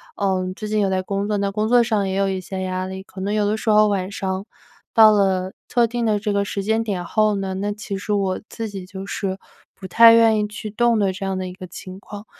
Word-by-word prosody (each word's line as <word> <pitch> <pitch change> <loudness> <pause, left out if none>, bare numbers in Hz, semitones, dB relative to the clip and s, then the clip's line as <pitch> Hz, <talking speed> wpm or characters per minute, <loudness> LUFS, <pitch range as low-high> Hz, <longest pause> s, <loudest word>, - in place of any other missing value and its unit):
呃， 190 -2 0
最 215 0 -6
近 215 0 +1
有 200 -2 +2
在 190 0 0
工 200 +2 -3
作， 210 - 0
那 200 0 -1
工 215 +2 -1
作 240 +1 +5
上 215 -4 0
也 190 - -2
有 195 0 +1
一 190 -1 -2
些 190 +1 -5
压 185 0 -2
力， 190 0 -7
可 190 - -13
能 200 +2 -2
有 210 -1 +1
的 210 +1 0
时 220 - -3
候 215 0 +5
晚 190 -2 -1
上 190 -1 -4 0.5
到 220 -1 +8
了 190 -2 +1
特 240 -1 +3
定 235 0 -2
的 210 -1 +1
这 210 0 -2
个 200 0 +1
时 200 -1 -4
间 220 +2 +1
点 195 -5 -3
后 215 +2 +2
呢， 195 -1 -3
那 205 +2 -2
其 205 -1 -5
实 200 +2 -5
我 195 -2 -1
自 225 -1 -5
己 195 -3 -7
就 190 +1 -8
是 190 -1 -3 0.4
不 190 - -9
太 230 +5 +8
愿 225 -1 +5
意 210 - +1
去 210 +1 -7
动 235 +1 +2
的 195 -2 +1
这 195 +1 -5
样 190 -1 -2
的 185 0 -3
一 180 - -7
个 185 0 -9
情 185 +2 -10
况。 205 +1 -10
200 Hz, 285 characters per minute, -21 LUFS, 190-215 Hz, 0.5 s, 到